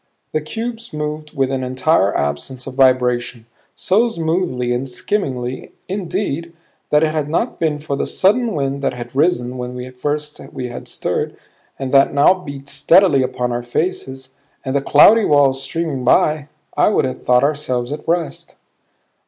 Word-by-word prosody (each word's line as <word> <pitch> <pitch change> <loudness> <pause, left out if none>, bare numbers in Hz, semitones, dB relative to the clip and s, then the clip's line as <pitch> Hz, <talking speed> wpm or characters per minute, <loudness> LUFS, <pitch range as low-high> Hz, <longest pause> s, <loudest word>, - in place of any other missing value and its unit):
The 155 - -1
cubes 230 +7 -6
moved 150 0 -5
with 135 -1 +1
an 130 -1 -2
entire 130 -4 +2
absence 70 - -3
of 135 - -7
vibration; 125 -3 +2 0.3
so 215 +6 +2
smoothly 160 - -1
and 130 +2 -2
skimmingly, 130 -5 -3
indeed, 170 -4 -3 0.4
that 150 +1 +4
had 155 -1 0
it - - -9
not 160 - -1
been 155 -3 0
for 145 -1 -4
the - - -2
sudden 220 +3 +2
wind 140 -1 -2
that 135 - -1
had 120 +1 -8
risen 130 -5 +1
when 125 +1 -6
first 150 +3 -3
we 130 -3 -4
had 120 - -8
stirred, - - -3 0.4
and 135 -1 -4
that 140 +1 +4
now 145 +6 +6
beat 140 -7 -9
steadily 150 +2 +4
upon 125 -1 -1
our 120 0 -2
faces, 130 0 -3 0.4
and 130 +1 -2
the 140 - +2
cloudy 210 +11 +6
walls 140 -5 +3
streaming 150 -2 -3
by, 150 +3 +3 0.3
I - - +4
would 210 - +2
have 130 - -4
thought 125 +1 +3
ourselves 140 -4 -1
at 150 - -6
rest. 170 -1 -2
140 Hz, 160 wpm, -19 LUFS, 130-160 Hz, 0.4 s, now